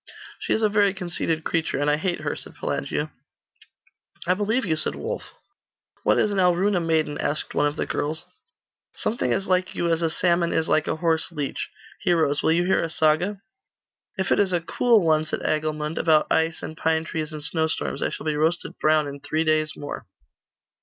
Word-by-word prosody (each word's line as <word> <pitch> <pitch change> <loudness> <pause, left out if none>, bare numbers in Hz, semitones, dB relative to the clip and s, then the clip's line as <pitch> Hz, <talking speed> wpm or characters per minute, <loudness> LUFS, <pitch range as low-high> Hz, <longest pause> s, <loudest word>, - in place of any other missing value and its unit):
'She - - -4
is 220 - +1
a - - +6
very 205 -2 +3
conceited 170 -3 -2
creature, 160 -3 0
and 145 +1 0
I 150 - +4
hate 175 +3 -2
her,' - - -2
said - - -10
Pelagia. - - -2 1.1
'I 180 - +3
believe 215 +6 0
you,' 160 -4 +1
said 155 - -1
Wulf. - - -5 0.7
'What - - +3
is 210 - +2
an 200 - 0
Alruna 180 +2 +3
maiden?' 160 -2 0
asked 150 - -1
one 145 - +2
of 145 - -3
the - - -1
girls. 155 +3 -3 0.7
'Something 235 - 0
as 195 - +1
like 185 -1 0
you 170 -1 0
as 165 - 0
a 165 - +2
salmon 170 +1 +2
is 160 - +1
like 155 - +2
a - - 0
horse 160 +1 +1
leech. 150 -4 -3 0.3
Heroes, 160 -5 +2
will - - +2
you 170 +2 +3
hear 185 - +2
a 165 - -2
saga?' 165 +6 +1 0.8
'If 190 -2 -1
it - - +4
is 195 -2 +2
a 175 - +3
cool 220 +3 +3
one,' 155 -1 +3
said - - -2
Agilmund; 155 0 -1
'about 155 -2 +4
ice, 160 0 +1
and 160 - -6
pine 160 0 +1
trees, 160 -1 -4
and 155 -1 -4
snowstorms, 160 +1 -1
I - - +1
shall - - -7
be 155 -1 0
roasted 160 +3 -1
brown 155 -1 +3
in 140 0 -7
three 155 +3 -1
days 155 -1 +2
more. 145 - -6
160 Hz, 200 wpm, -24 LUFS, 155-180 Hz, 1.1 s, a